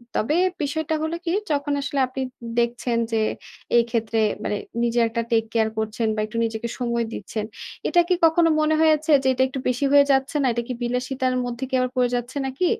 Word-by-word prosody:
তবে 260 Hz, +8 st, +1 dB, 0.3 s
বিষয়টা 315 Hz, +2 st, -1 dB
হলো 315 Hz, +1 st, -2 dB
কি? 335 Hz, -, 0 dB, 0.2 s
যখন 285 Hz, 0 st, 0 dB
আসলে 280 Hz, 0 st, -2 dB
আপনি 260 Hz, +1 st, -5 dB, 0.4 s
দেখছেন 235 Hz, 0 st, 0 dB
যে, 225 Hz, -1 st, +1 dB, 0.6 s
এক্ষেত্রে 230 Hz, -1 st, 0 dB, 0.2 s
মানে, 210 Hz, -, -1 dB, 0.3 s
নিজের 235 Hz, 0 st, +2 dB
একটা 230 Hz, +1 st, -1 dB
টেক 225 Hz, -1 st, +3 dB
কেয়ার 220 Hz, -1 st, +2 dB
করছেন 220 Hz, +1 st, -1 dB
বা -, -, -3 dB
একটু 220 Hz, +2 st, -7 dB
নিজেকে 225 Hz, +1 st, -3 dB
সময় 235 Hz, -1 st, 0 dB
দিচ্ছেন। 210 Hz, +2 st, -4 dB, 0.4 s
এটা 350 Hz, -, +4 dB
কি 365 Hz, -, +3 dB
কখনো 330 Hz, +1 st, +4 dB
মনে 310 Hz, 0 st, +2 dB
হয়েছে 310 Hz, -1 st, +3 dB
যে, -, -, +1 dB
এটা 260 Hz, +1 st, +2 dB
একটু 265 Hz, +1 st, -5 dB
বেশি 250 Hz, +3 st, 0 dB
হয়ে 285 Hz, 0 st, +7 dB
যাচ্ছে 270 Hz, +2 st, +1 dB
না? -, -, +1 dB
এটা 235 Hz, +1 st, -2 dB
কি 250 Hz, -, -3 dB
বিলাসিতার 255 Hz, +1 st, -1 dB
মধ্যে 245 Hz, +1 st, -5 dB
কি -, -, -16 dB
আবার 255 Hz, 0 st, 0 dB
পড়ে 250 Hz, -1 st, +3 dB
যাচ্ছে 245 Hz, +3 st, -4 dB
নাকি? 265 Hz, +7 st, -1 dB
250 Hz, 195 wpm, -23 LUFS, 235-285 Hz, 0.6 s, হয়ে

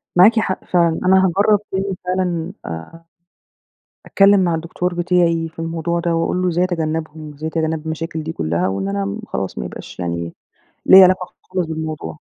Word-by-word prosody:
معاكِ 210 Hz, +6 st, +6 dB
حق 190 Hz, -4 st, -2 dB
فعلًا، 170 Hz, -2 st, +2 dB
أنا 190 Hz, +1 st, +5 dB
هاجرب 200 Hz, +3 st, +3 dB
تاني 190 Hz, 0 st, -2 dB
فعلًا، 180 Hz, -1 st, -1 dB
آآ، 85 Hz, -, -8 dB, 1.0 s
اتكلم 200 Hz, 0 st, +5 dB
مع 170 Hz, -2 st, +1 dB
الدكتور 170 Hz, +2 st, -3 dB
بتاعي 170 Hz, -2 st, +1 dB
في 160 Hz, -, -23 dB
الموضوع 165 Hz, +1 st, -2 dB
ده، 170 Hz, -1 st, 0 dB
وأقول 165 Hz, +2 st, 0 dB
له 185 Hz, -, +1 dB
إزاي 175 Hz, +1 st, +1 dB
اتجنبهم 155 Hz, -3 st, -3 dB
إزاي 155 Hz, +2 st, -5 dB
اتجنب 160 Hz, -1 st, -2 dB
المشاكل 160 Hz, 0 st, -4 dB
دي 160 Hz, +1 st, -5 dB
كلَّها، 85 Hz, -, -1 dB
وإن 95 Hz, 0 st, -2 dB
أنا 100 Hz, 0 st, -2 dB
خلاص -, -, -4 dB
ما 65 Hz, -, -3 dB
يبقاش -, -, -9 dB
يعني 85 Hz, -1 st, -3 dB, 0.5 s
ليا 190 Hz, 0 st, +9 dB
علاقة 185 Hz, 0 st, +2 dB, 0.2 s
خالص 185 Hz, -3 st, -1 dB
بالموضوع. 155 Hz, -, -5 dB
165 Hz, 165 wpm, -19 LUFS, 155-180 Hz, 1.0 s, ليا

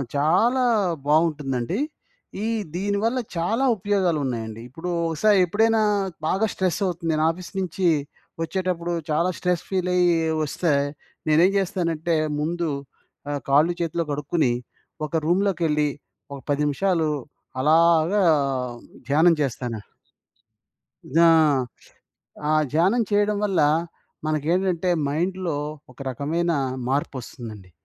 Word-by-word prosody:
చాలా 185 Hz, -, +3 dB, 0.4 s
బావుంటుందండి. 150 Hz, -, +1 dB, 0.6 s
ఈ -, -, 0 dB, 0.3 s
దీని 200 Hz, +2 st, -1 dB
వల్ల 235 Hz, +3 st, +1 dB, 0.2 s
చాలా 200 Hz, +10 st, 0 dB
ఉపయోగాలున్నాయండి, 150 Hz, -, -1 dB
ఇప్పుడూ 165 Hz, +7 st, -6 dB, 0.2 s
ఒకసారెప్పుడైనా 205 Hz, +5 st, +3 dB, 0.5 s
బాగా 195 Hz, +6 st, +2 dB
స్ట్రెస్ 185 Hz, -2 st, -1 dB
అవుతుంది, 170 Hz, -2 st, -2 dB
నేనాఫీసు 165 Hz, +3 st, 0 dB
నుంచీ 185 Hz, 0 st, -1 dB, 0.5 s
వచ్చేటప్పుడు, 175 Hz, 0 st, -2 dB, 0.2 s
చాలా 165 Hz, +4 st, +2 dB
స్ట్రెస్ 180 Hz, -2 st, 0 dB
ఫీలయ్యి 180 Hz, -2 st, +2 dB, 0.3 s
ఒస్తే, 155 Hz, +1 st, 0 dB, 0.6 s
నేనేం 165 Hz, +5 st, +5 dB
చేస్తానంటే, 170 Hz, -4 st, -1 dB, 0.2 s
ముందు 170 Hz, +2 st, -1 dB, 0.6 s
ఆహ్, 145 Hz, -, -3 dB
కాళ్ళు 150 Hz, +5 st, +4 dB
చేతులు 170 Hz, 0 st, -1 dB
కడుక్కొని, 145 Hz, -2 st, 0 dB, 0.5 s
ఒక 150 Hz, -, -22 dB
రూమ్‌లోకెళ్లి, 170 Hz, -4 st, +1 dB, 0.4 s
ఒక 140 Hz, -, -7 dB
10 145 Hz, 0 st, +1 dB
నిమిషాలు 160 Hz, +2 st, +1 dB, 0.5 s
అలాగా 155 Hz, +4 st, +4 dB, 1.3 s
ధ్యానం 160 Hz, +4 st, +5 dB
జేస్తాను. 120 Hz, -4 st, -2 dB, 1.3 s
ధ్యా 170 Hz, +1 st, +6 dB, 1.2 s
ఆ -, -, +3 dB, 0.2 s
ధ్యానం 190 Hz, +10 st, +3 dB
చేయడం 205 Hz, 0 st, +2 dB
వల్ల, 195 Hz, -3 st, +1 dB, 0.7 s
మనకేంటంటే 170 Hz, +4 st, 0 dB, 0.2 s
మైండ్‌లో, 175 Hz, +2 st, -1 dB, 0.3 s
ఒక 125 Hz, -, -19 dB
రకమైన 165 Hz, +7 st, -1 dB, 0.4 s
మార్పొస్తుందండి. 120 Hz, -7 st, -4 dB
170 Hz, 95 wpm, -24 LUFS, 150-185 Hz, 1.3 s, ధ్యా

